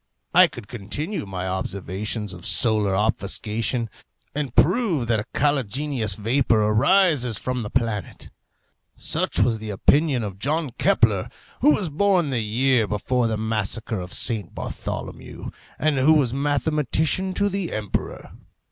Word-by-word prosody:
I - - +8
could 100 - -10
continue 125 - -4
my 95 -1 -4
observations 95 +2 -3
of 90 -1 -11
solar 105 -4 +2
obfuscation, 110 +3 -1 0.5
and 140 -4 -3
prove 180 - +3
that 115 -2 +1
a 105 - -4
caligenous 135 -5 0
vapour 115 +3 +2
arises 125 - +3
from 125 +2 -3
the 105 - -5
planet. 115 -7 -3 0.6
Such - - 0
was 110 +1 +2
the 110 0 -6
opinion 135 +5 +2
of 100 -2 -6
John 150 +3 -1
Kepler, 105 -5 +3 0.3
who 285 - +5
was 200 - +2
born 175 -1 +2
the 125 - 0
year 115 +2 +2
before 115 +4 0
the 110 -1 -1
Massacre 110 0 -2
of 90 0 -7
St. 110 -4 -2
Bartholomew, - - -6 0.3
and 150 -1 +1
who 145 +5 +5
was 135 -6 +2
mathematician 150 +6 0
to 205 - +2
the 195 -3 -2
emperor. 105 -2 -4
120 Hz, 140 wpm, -23 LUFS, 105-150 Hz, 0.6 s, I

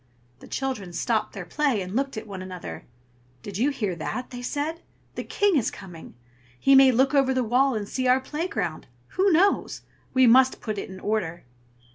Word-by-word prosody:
The - - -13
children 255 -10 -4
stopped 225 +5 -1
their 195 -3 -6
play, 275 - 0
and 185 +1 -5
looked 270 -2 -1
at 220 - -5
one 195 -3 -7
another. 185 -1 -8 0.6
"Did 200 0 -6
you 265 +5 +3
hear 210 -10 -2
that?" 245 +10 -4
they 245 -1 -7
said. 300 +6 -3 0.3
"The - - -5
King 410 -3 +1
is 245 - +1
coming. 175 -8 -11 0.4
He 275 - +4
may 270 -1 +8
look 265 +3 +2
over 270 -2 +3
the 255 - +2
wall 255 +3 +2
and 205 -2 -3
see 255 +3 -2
our 255 +1 +5
playground; 265 - -4 0.2
who 385 +1 +2
knows? 375 +5 +2 0.3
We 260 0 +6
must 255 +2 +5
put 215 -3 -4
it - - -6
in 190 0 -9
order." 190 -6 -2
250 Hz, 190 wpm, -25 LUFS, 200-275 Hz, 0.6 s, may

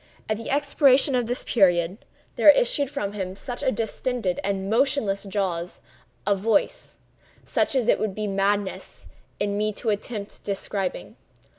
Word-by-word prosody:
At 215 - -1
the 230 - -7
expiration 280 -1 +4
of 245 -2 +1
this 245 +1 -2
period, 180 -2 +2 0.4
there - - +6
issued - - +4
from 205 -9 -3
the 210 +7 -3
distended 225 -3 -2
and 195 -1 -2
motionless 225 -3 +1
jaws 185 -4 -3 0.5
a 200 0 +3
voice—such 215 +6 -2
as 250 -4 +1
it - - +4
would 210 -3 -2
be 215 - -3
madness 200 0 -2 0.3
in 205 0 -1
me 215 0 +1
to 220 +2 -1
attempt 205 0 -5
describing. 195 -1 -4
210 Hz, 135 wpm, -24 LUFS, 195-245 Hz, 0.5 s, there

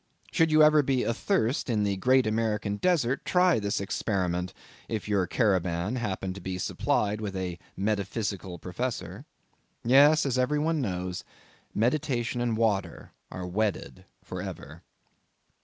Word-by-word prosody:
Should 165 -1 +3
you 155 0 +6
ever 150 0 +6
be 130 -2 0
athirst 130 - 0
in 110 -3 +1
the 100 -1 0
great 130 +6 +3
American 110 -2 -1
desert, 140 - +1
try 180 -7 +3
this 100 -1 -1
experiment, 90 -3 -1 0.4
if 110 -2 -3
your 100 -3 +1
caravan 95 0 0
happen 95 -5 -3
to 100 - -9
be 95 +1 -4
supplied 105 +3 0
with 100 -3 -4
a 90 -2 -4 0.2
metaphysical 100 -2 -2
professor. 110 +9 -5 0.6
Yes, 145 +6 +6
as 130 -2 0
every 130 +4 +1
one 155 +1 0
knows, 90 -5 -3 0.5
meditation 125 0 0
and 120 -2 0
water 110 -4 -1 0.2
are 90 0 -6
wedded 100 +3 -2 0.2
for - - -6
ever. - - -8
110 Hz, 140 wpm, -28 LUFS, 95-130 Hz, 0.6 s, you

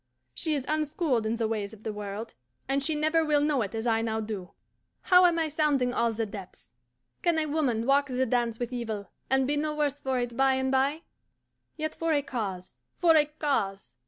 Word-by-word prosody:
She 310 - -1
is 270 -3 -3
unschooled 300 -6 0
in 225 - 0
the 225 -1 0
ways 215 -1 -3
of 215 - -20
the 220 - -3
world, 205 +2 -6 0.3
and 275 +1 0
she 310 +2 0
never 310 +2 +2
will 300 -2 +3
know 295 -4 +2
it 210 +1 -3
as 225 +1 -3
I 225 -1 +2
now 220 -1 -1
do. 210 -4 -5 0.5
How 360 0 +6
am 340 -1 +1
I 325 -1 +1
sounding 290 -5 +1
all 235 -1 +2
the 225 0 -2
depths! 200 - -10 0.5
Can 340 -2 +2
a 315 - +2
woman 280 -7 0
walk 280 +2 +3
the 260 0 0
dance 235 -2 0
with 245 +1 -4
evil, 220 -4 -4 0.2
and 265 0 +3
be 290 +2 0
no 300 +1 -1
worse 290 -1 0
for 265 -1 -1
it 245 -1 -3
by 265 +1 +3
and 265 0 0
bye? 275 +5 +1 0.7
Yet 310 0 -2
for 330 -1 0
a 290 -1 +2
cause, 200 -9 -5 0.2
for 335 -2 +5
a 300 -1 +6
cause! 200 - -2
265 Hz, 215 wpm, -28 LUFS, 225-300 Hz, 0.7 s, How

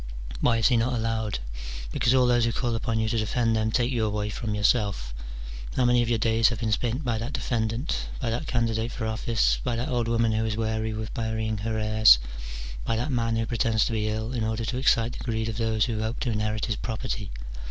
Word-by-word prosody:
Why 115 - +3
is 115 - +4
he 125 - +3
not 120 +3 +1
allowed? 110 -2 -1 0.5
because 120 - +2
all 130 -1 +5
those 120 -1 +3
who 115 - +1
call 120 0 -1
upon 115 0 -1
you 110 - +1
to 115 +1 0
defend 115 +1 +1
them, 110 0 +1
take 120 +2 +1
you 120 -3 0
away 105 -1 -1
from 105 -1 -3
yourself. 105 - +1 0.6
How 130 - +3
many 120 0 +4
of 120 - 0
your 115 - +2
days 115 0 +3
have 120 -3 -4
been 110 -2 -1
spent 120 +5 0
by 115 -2 0
that 120 +5 -4
defendant? 120 +2 -1
by 120 -5 -1
that 125 +7 -2
candidate 115 -2 0
for 110 - -4
office? 110 - +1
by 120 - -1
that 120 +2 -2
old 120 -2 0
woman 115 -1 +2
who 110 0 +1
is 110 -1 -1
weary 110 0 -1
with 110 0 -5
burying 110 -1 -2
her 110 +2 -2
heirs? 110 - +6 0.7
by 115 - 0
that 120 +6 -1
man 115 -2 +1
who 115 0 0
pretends 115 -1 +1
to - - -2
be 110 -1 0
ill, 110 +3 -3
in 120 -3 -1
order 110 +1 -1
to 125 - -2
excite 115 -3 +3
the - - -7
greed 110 -2 -1
of 110 -1 -4
those 110 -2 +2
who 110 -3 -2
hope 110 +3 -2
to 120 - 0
inherit 105 0 -1
his 110 -4 -2
property? 110 -3 -4
115 Hz, 235 wpm, -26 LUFS, 110-120 Hz, 0.7 s, heirs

